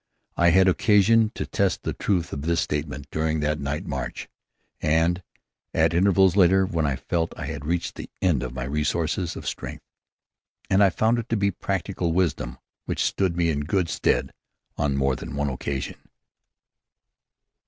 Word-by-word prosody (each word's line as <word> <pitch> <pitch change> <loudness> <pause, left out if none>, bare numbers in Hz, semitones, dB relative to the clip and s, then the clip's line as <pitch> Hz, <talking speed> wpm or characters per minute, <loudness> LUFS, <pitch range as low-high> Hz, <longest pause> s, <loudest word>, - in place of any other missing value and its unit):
I 85 0 +4
had 95 +2 +5
occasion 105 +3 +4
to - - -3
test 100 -3 0
the - - -2
truth 90 -4 -1
of 70 - -4
this 85 +2 +1
statement 75 -2 -3
during 80 0 0
that 75 +1 0
night 70 +2 -3
march, - - -4 0.5
and 80 +3 +2 0.5
at - - +3
intervals 95 +1 +4
later, 95 0 +5
when 80 -4 -1
I 70 - 0
felt 80 +4 -1
that - - -9
I - - -3
had 70 0 -5
reached 85 +1 -1
the - - -8
end 85 -9 +2
of 65 -1 -4
my 65 0 -5
resources 80 +5 -1
of - - -7
strength. - - -5 0.9
And 95 +1 +5
I 100 - +6
found 110 +5 +1
it 115 - -6
to 115 - +1
be 100 0 +2
practical 95 -2 -2
wisdom 80 -9 0 0.3
which - - -1
stood 95 -3 0
me 85 -1 +2
in 70 - -1
good 85 +4 0
stead - - +1 0.4
on 70 -2 0
more 70 -1 +2
than - - -7
one 70 0 0
occasion. 65 +1 -4
85 Hz, 175 wpm, -25 LUFS, 75-95 Hz, 0.9 s, I